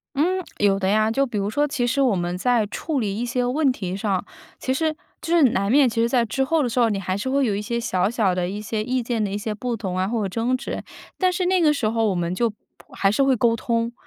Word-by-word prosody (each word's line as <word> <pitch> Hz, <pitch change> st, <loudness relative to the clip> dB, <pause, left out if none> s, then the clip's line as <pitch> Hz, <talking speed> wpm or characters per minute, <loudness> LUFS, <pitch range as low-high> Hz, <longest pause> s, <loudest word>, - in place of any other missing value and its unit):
嗯， 365 Hz, +6 st, +1 dB, 0.2 s
有 200 Hz, -1 st, +3 dB
的 190 Hz, -1 st, 0 dB
呀。 215 Hz, +2 st, +3 dB
就 275 Hz, +5 st, +1 dB
比 235 Hz, -, -6 dB
如 200 Hz, +1 st, -1 dB
说 290 Hz, +6 st, +1 dB
其 275 Hz, -4 st, -1 dB
实 255 Hz, +3 st, 0 dB
我 250 Hz, -7 st, +3 dB
们 175 Hz, 0 st, -2 dB
在 235 Hz, +2 st, +2 dB
处 295 Hz, +8 st, -3 dB
理 200 Hz, -3 st, -2 dB
一 235 Hz, -, -2 dB
些 245 Hz, +1 st, -1 dB
问 275 Hz, +3 st, +2 dB
题 190 Hz, -7 st, -4 dB
上， 195 Hz, -2 st, -1 dB, 0.3 s
其 260 Hz, -, -1 dB
实 315 Hz, +3 st, 0 dB, 0.3 s
就 335 Hz, +1 st, 0 dB
是 335 Hz, -, +5 dB
难 200 Hz, +1 st, 0 dB
免， 275 Hz, +1 st, +5 dB
其 230 Hz, 0 st, -1 dB
实 230 Hz, -, +3 dB
在 240 Hz, -1 st, +2 dB
之 265 Hz, +4 st, -1 dB
后 320 Hz, +3 st, +1 dB
的 250 Hz, -, 0 dB
时 245 Hz, +2 st, 0 dB
候， 235 Hz, -, +4 dB
你 205 Hz, -3 st, -1 dB
还 185 Hz, -1 st, -2 dB
是 205 Hz, +6 st, -3 dB
会 275 Hz, +1 st, +2 dB
有 215 Hz, -5 st, 0 dB
一 200 Hz, -, -2 dB
些 235 Hz, +3 st, -2 dB
小 190 Hz, -5 st, 0 dB
小 215 Hz, -6 st, +1 dB
的 180 Hz, -1 st, -1 dB
一 205 Hz, +3 st, -5 dB
些 215 Hz, +1 st, -3 dB
意 255 Hz, +3 st, -1 dB
见 230 Hz, -1 st, -1 dB
的 205 Hz, -, -1 dB
一 200 Hz, -, -2 dB
些 210 Hz, +1 st, -3 dB
不 235 Hz, +3 st, -3 dB
同 190 Hz, -4 st, -4 dB
啊， 185 Hz, +1 st, 0 dB
或 230 Hz, 0 st, -1 dB
者 195 Hz, -, -1 dB
争 230 Hz, +6 st, 0 dB
执。 255 Hz, -, -5 dB, 0.4 s
但 370 Hz, -1 st, +2 dB
是 365 Hz, +1 st, -1 dB
那 370 Hz, 0 st, +3 dB
个 310 Hz, -3 st, +4 dB
时 250 Hz, -7 st, 0 dB
候 225 Hz, 0 st, +1 dB
我 195 Hz, -, 0 dB
们 175 Hz, 0 st, -1 dB
就 230 Hz, +3 st, 0 dB, 0.4 s
还 195 Hz, -, +2 dB
是 245 Hz, -, +2 dB
会 270 Hz, -1 st, +3 dB
沟 230 Hz, 0 st, +3 dB
通， 230 Hz, 0 st, -1 dB
230 Hz, 305 characters per minute, -23 LUFS, 200-260 Hz, 0.4 s, 是